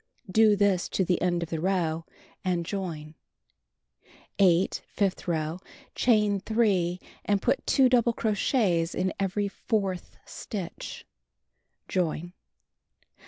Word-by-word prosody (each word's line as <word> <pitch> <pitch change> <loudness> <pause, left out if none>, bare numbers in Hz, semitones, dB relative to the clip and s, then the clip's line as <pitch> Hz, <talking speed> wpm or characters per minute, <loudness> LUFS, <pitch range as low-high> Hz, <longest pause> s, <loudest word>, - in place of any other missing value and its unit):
Do 215 0 +5
this 200 -3 +2
to 190 - +2
the 180 0 +1
end 175 -1 +1
of 165 - -8
the 165 - -1
row 165 -3 0 0.4
and 175 -2 0
join. 165 -6 -5 1.3
8. 185 -1 +3
Fifth 195 -3 -1
row: 160 0 -1 0.3
Chain 210 -4 +3
3, 190 -5 +1 0.3
and 205 -1 +2
put 260 +6 0
2 270 -2 +5
double 240 -2 +3
crochets 205 -6 +1
in 185 +1 0
every 200 +1 0
fourth 195 -3 -2
stitch. 190 -6 -7 0.8
Join. 175 -1 -1
190 Hz, 115 wpm, -27 LUFS, 175-205 Hz, 1.3 s, Do